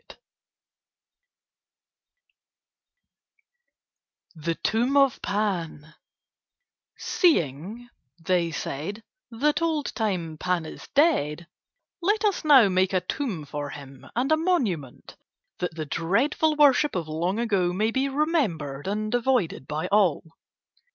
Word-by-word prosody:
THE 165 Hz, 0 st, -3 dB
TOMB 240 Hz, +10 st, 0 dB
OF 275 Hz, -2 st, +3 dB
PAN 170 Hz, -7 st, -3 dB, 1.0 s
"Seeing," 210 Hz, -, 0 dB, 0.3 s
they 170 Hz, 0 st, +1 dB
said, 165 Hz, +7 st, -5 dB, 0.3 s
"that 290 Hz, +7 st, 0 dB
old 315 Hz, -3 st, -1 dB
time 175 Hz, -8 st, -2 dB
Pan 180 Hz, -3 st, -1 dB
is -, -, -10 dB
dead, 175 Hz, -, +2 dB, 0.6 s
let 415 Hz, +4 st, +1 dB
us 405 Hz, -3 st, 0 dB
now 275 Hz, -8 st, +7 dB
make 185 Hz, 0 st, +1 dB
a 185 Hz, -, +2 dB
tomb 210 Hz, -, -4 dB
for 145 Hz, 0 st, -5 dB
him 140 Hz, -2 st, -11 dB
and 255 Hz, +5 st, 0 dB
a 315 Hz, -, +5 dB
monument, 230 Hz, -, -2 dB, 0.4 s
that 180 Hz, -2 st, -3 dB
the 155 Hz, -2 st, -4 dB
dreadful 235 Hz, -, +1 dB
worship 295 Hz, -2 st, +4 dB
of 170 Hz, -4 st, -2 dB
long 170 Hz, +6 st, -2 dB
ago 200 Hz, -7 st, +1 dB
may 215 Hz, +5 st, 0 dB
be 270 Hz, +3 st, 0 dB
remembered 215 Hz, -, -1 dB
and 215 Hz, +2 st, -2 dB
avoided 245 Hz, -, 0 dB
by 155 Hz, +3 st, -3 dB
all." 200 Hz, -7 st, +3 dB
200 Hz, 110 wpm, -25 LUFS, 165-270 Hz, 1.0 s, now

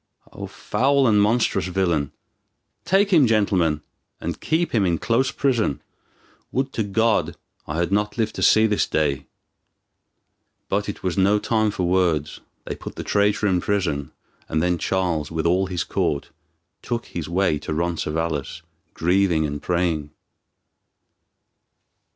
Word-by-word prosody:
O -, -, -6 dB
foul 140 Hz, +1 st, +1 dB
and 105 Hz, -2 st, +4 dB
monstrous 110 Hz, -1 st, +2 dB
villain! 85 Hz, -7 st, 0 dB, 0.7 s
Take 195 Hz, +3 st, +3 dB
him, 150 Hz, -7 st, +6 dB
gentleman, 95 Hz, -8 st, +1 dB, 0.4 s
and 85 Hz, -1 st, -5 dB
keep 165 Hz, +2 st, 0 dB
him 110 Hz, -4 st, +3 dB
in 85 Hz, -3 st, +1 dB
close 120 Hz, +7 st, +1 dB
prison. 115 Hz, -, 0 dB, 0.7 s
Would 135 Hz, +1 st, -1 dB
to -, -, -1 dB
God 110 Hz, +2 st, +1 dB, 0.3 s
I 75 Hz, -, -3 dB
had 85 Hz, +2 st, 0 dB
not 105 Hz, +2 st, 0 dB
lived 110 Hz, -2 st, 0 dB
to -, -, -6 dB
see 110 Hz, 0 st, +5 dB
this 105 Hz, -2 st, +1 dB
day!" 70 Hz, -3 st, 0 dB, 1.4 s
But 100 Hz, +1 st, -1 dB
it 100 Hz, -, -7 dB
was 90 Hz, 0 st, -1 dB
no 100 Hz, +2 st, +4 dB
time 110 Hz, 0 st, +1 dB
for 95 Hz, -, -3 dB
words. 85 Hz, -5 st, +1 dB, 0.3 s
They -, -, -4 dB
put -, -, -9 dB
the -, -, -5 dB
traitor 105 Hz, +1 st, +1 dB
in 95 Hz, -3 st, +2 dB
prison 85 Hz, -9 st, -1 dB, 0.4 s
and 80 Hz, -, 0 dB
then 90 Hz, +1 st, +1 dB
Charles, 85 Hz, -6 st, -1 dB
with 80 Hz, 0 st, -3 dB
all 90 Hz, +3 st, +2 dB
his 90 Hz, -3 st, -2 dB
court, 70 Hz, -, -2 dB, 0.5 s
took 120 Hz, -1 st, -3 dB
his 85 Hz, -2 st, -6 dB
way 85 Hz, -4 st, +1 dB
to 75 Hz, -, -6 dB
Roncesvalles, 80 Hz, -2 st, -2 dB, 0.3 s
grieving 90 Hz, -2 st, +2 dB
and 75 Hz, -1 st, -4 dB
praying. 85 Hz, -4 st, -1 dB
95 Hz, 145 wpm, -23 LUFS, 80-110 Hz, 1.4 s, him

